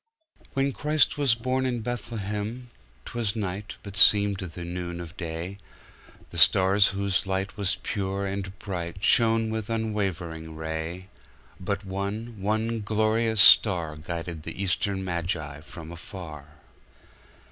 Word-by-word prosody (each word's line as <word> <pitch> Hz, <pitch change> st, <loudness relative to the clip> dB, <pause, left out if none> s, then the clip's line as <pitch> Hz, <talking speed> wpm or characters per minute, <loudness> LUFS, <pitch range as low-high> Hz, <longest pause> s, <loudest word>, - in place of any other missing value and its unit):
When 135 Hz, 0 st, +1 dB
Christ 150 Hz, +1 st, +2 dB
was 135 Hz, -5 st, +4 dB
born 130 Hz, +3 st, -1 dB
in 125 Hz, -3 st, -1 dB
Bethlehem,'T 105 Hz, -, -6 dB
was 115 Hz, -3 st, 0 dB
night, 100 Hz, -1 st, -4 dB
but 100 Hz, -1 st, -8 dB
seemed 100 Hz, 0 st, +6 dB
the 85 Hz, -2 st, -6 dB
noon 85 Hz, 0 st, -5 dB
of 85 Hz, -1 st, -8 dB
day; 85 Hz, +3 st, -5 dB, 0.7 s
The -, -, -3 dB
stars, 95 Hz, +2 st, +6 dB
whose 100 Hz, -1 st, -1 dB
light 95 Hz, +2 st, -2 dB
Was 100 Hz, -2 st, 0 dB
pure 100 Hz, -1 st, -2 dB
and 100 Hz, 0 st, -4 dB
bright, 90 Hz, -3 st, -5 dB
Shone 115 Hz, -2 st, +4 dB
with 110 Hz, -1 st, -3 dB
unwavering 95 Hz, -8 st, -3 dB
ray; 80 Hz, +3 st, -4 dB, 0.5 s
But 100 Hz, +2 st, -3 dB
one, 100 Hz, +3 st, -4 dB
one 110 Hz, +3 st, 0 dB
glorious 110 Hz, +1 st, +2 dB
starGuided 85 Hz, -4 st, +4 dB
the 85 Hz, +3 st, -8 dB
Eastern 95 Hz, 0 st, 0 dB
Magi 85 Hz, -5 st, -3 dB
from 80 Hz, 0 st, -10 dB
afar. 85 Hz, -4 st, -9 dB
100 Hz, 125 wpm, -26 LUFS, 85-110 Hz, 0.7 s, seemed